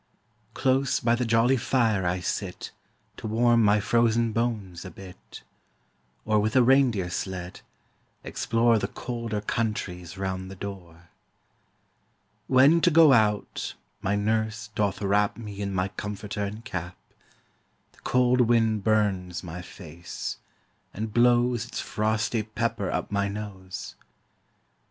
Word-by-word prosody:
Close 135 0 +2
by 115 0 +2
the 120 0 0
jolly 115 +3 +3
fire 115 -6 +1
I 90 +1 -1
sit 90 0 -4 0.5
To - - -6
warm 120 +2 +3
my 105 0 +4
frozen 115 +2 +2
bones 105 -7 -2
a 95 - -7
bit; 95 -1 -12 0.8
Or 110 -1 +3
with 110 +1 0
a 130 - +6
reindeer 120 -8 +3
sled, 90 -1 -5 0.6
explore 115 0 +2
The 100 - -2
colder 115 -2 -4
countries 95 -5 -3
round 95 -1 -3
the 95 - -8
door. 85 -4 -9 1.4
When 140 +6 +5
to 175 - +5
go 160 -3 +7
out, 105 -3 +1 0.3
my 100 - 0
nurse 110 +1 -1
doth 105 -1 -1
wrap 100 +1 +2
Me 105 -3 -7
in 100 -1 -2
my 95 0 -1
comforter 105 0 -5
and 105 +3 -7
cap; 90 -4 -5 0.9
The - - -24
cold 125 0 +2
wind 115 -3 +2
burns 100 -5 0
my 90 0 -7
face, 85 -1 -7 0.6
and 110 +1 -4
blows 120 0 +3
Its - - -5
frosty 110 +1 0
pepper 110 -2 -2
up - - -3
my 100 0 +1
nose. 100 -2 -7
105 Hz, 130 wpm, -26 LUFS, 95-115 Hz, 1.4 s, go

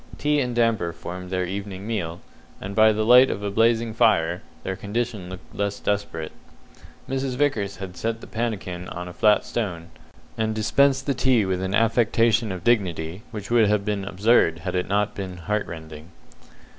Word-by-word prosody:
Tea 150 0 +1
and 125 -3 -1
damper 115 -8 +1
formed 90 +2 -7
their 90 0 -1
evening 100 +1 -5
meal; 90 -7 -3 0.4
and 100 +1 -6
by 110 0 +6
the 110 0 0
light 125 +3 +7
of 100 - -3
a 100 - -2
blazing 115 +1 +2
fire, 85 -5 +2 0.2
their 95 - -3
condition 105 -2 -3
looked 95 0 -11
less 100 0 -2
desperate. 100 -6 -2 0.8
Mrs. 135 -1 -2
Vickers 110 -8 0
had 95 -2 -8
set 115 +2 -2
the - - -11
pannikin 100 -6 -4
on 90 +1 -6
a 90 - -8
flat 105 +2 +3
stone, 90 -8 -4 0.5
and 110 0 0
dispensed 135 +4 +2
the 140 - +1
tea 125 -5 +2
with 95 -1 -1
an 95 +1 -1
affectation 115 -1 +2
of 90 -1 -6
dignity 95 -6 0
which 105 -2 -7
would 115 -3 +5
have 105 -1 +1
been 105 -2 -1
absurd 95 -3 +3
had 90 - -2
it 90 0 -1
not 105 +1 +1
been 95 -3 -6
heart 105 +5 -2
rending. 80 -1 -9
105 Hz, 180 wpm, -24 LUFS, 90-115 Hz, 0.8 s, light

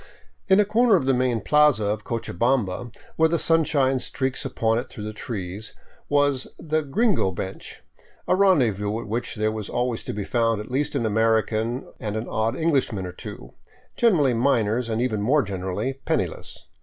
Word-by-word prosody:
In 190 0 +5
a 210 - +5
corner 225 +1 +4
of 155 -8 +1
the 135 - +3
main 125 -3 +1
plaza 150 -4 +4
of 105 +1 -1
Cochabamba, 115 0 -1 0.3
where 160 0 +4
the 170 - +1
sunshine 145 -5 +2
streaks 130 +2 -3
upon 115 -4 0
it 125 - -7
through 105 - -8
the 110 0 -5
trees, 105 -2 -6 0.3
was 145 -2 +2
the 155 0 -1
"gringo 190 - +1
bench," 95 +1 -7 0.4
a - - +3
rendez 180 - +4
vous 105 +2 -2
at - - -9
which 115 +4 -3
there 110 0 0
was 110 -2 -5
always 120 -2 -1
to - - -3
be 100 0 -4
found 115 -2 +1
at 105 - -8
least 140 +3 -1
an 125 -5 0
American 110 +2 +1
and 105 0 -3
an 110 - -4
odd 110 +1 -1
Englishman 135 - 0
or 90 - -5
two, - - -9 0.4
generally 165 - +3
miners 115 -1 +1
and 115 +2 0
even 110 -5 -1
more 140 +7 +3
generally 95 +5 -3
penniless. - - -3
120 Hz, 180 wpm, -24 LUFS, 110-145 Hz, 0.4 s, In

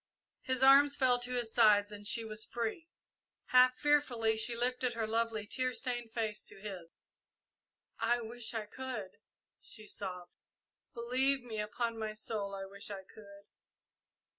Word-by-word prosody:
His 260 0 0
arms 280 +1 +7
fell 255 -3 +3
to 245 +1 -3
his 235 -2 -2
sides 210 -3 +5
and 205 0 -8
she 230 +1 0
was 215 0 -4
free. 235 +9 -4 0.6
Half 255 0 +6
fearfully 255 -7 +2
she 220 +2 +1
lifted 250 0 0
her 225 -1 -1
lovely, 225 -1 -1
tear 255 +4 -1
stained 240 -3 -2
face 220 -2 -2
to - - -6
his. 190 -5 -7 1.1
"I 235 +1 +2
wish 235 0 -4
I 220 -1 -2
could!" 215 -4 -6 0.5
she 215 -2 -9
sobbed. 180 -4 -6 0.6
"Believe 255 +3 +1
me, 225 -3 -5
upon 230 +2 -2
my 215 -1 -3
soul, 210 -2 -3
I 195 0 -5
wish 200 +2 -7
I 195 -2 -6
could!" 200 0 -15
230 Hz, 150 wpm, -33 LUFS, 210-250 Hz, 1.1 s, arms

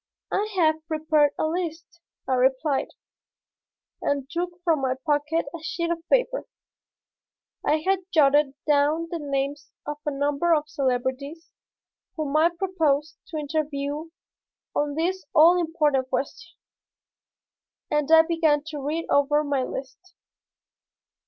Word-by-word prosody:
"I 420 +2 0
have 315 -3 +2
prepared 310 -2 +2
a - - 0
list," 335 0 -4 0.3
I 265 - +1
replied, 265 +3 +2 1.1
and 280 -2 -1
took 350 +1 -3
from 325 -5 +2
my 260 -1 0
pocket 300 +2 +1
a 335 - -6
sheet 335 +1 -2
of 340 - -1
paper. - - +1 1.2
I 305 +1 +1
had 385 0 +2
jotted 290 -2 +4
down 300 +3 +2
the 340 - -3
names 285 0 -3 0.2
of 295 0 -4
a - - -1
number 290 +4 +1
of 300 -1 -1
celebrities 275 +3 -2 0.6
whom 305 -2 -3
I 320 +2 +5
proposed 325 -5 0
to 320 - -6
interview 295 0 -3 0.7
on 290 -1 0
this 360 +4 -1
all 335 +3 +7
important 300 -6 +1
question, 285 +13 -4 1.3
and 300 0 +1
I 320 0 +9
began 320 -3 +2
to 300 -2 -5
read 305 +4 -2
over 290 +1 +3
my 285 -2 0
list. 270 +8 -7
305 Hz, 125 wpm, -25 LUFS, 285-330 Hz, 1.3 s, I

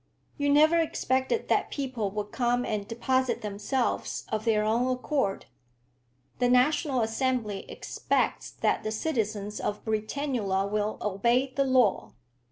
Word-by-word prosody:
You 285 -1 0
never 310 +4 +5
expected 265 - 0
that - - +2
people 255 -7 -2
would 210 +1 -5
come 245 -1 +1
and 205 -2 -2
deposit 255 +1 0
themselves 210 +5 -2
of 220 0 -2
their 215 -2 +3
own 230 +4 +1
accord." 255 -5 -1 0.9
"The 245 -1 +3
National 260 +1 +3
Assembly 225 -2 -1
expects - - -1
that - - 0
the 215 - -3
citizens 215 -5 -2
of 210 - -3
Britannula 215 -3 -1
will 210 0 -1
obey 235 +6 +1
the 275 - +2
law." 255 -6 +2
240 Hz, 130 wpm, -28 LUFS, 210-260 Hz, 0.9 s, never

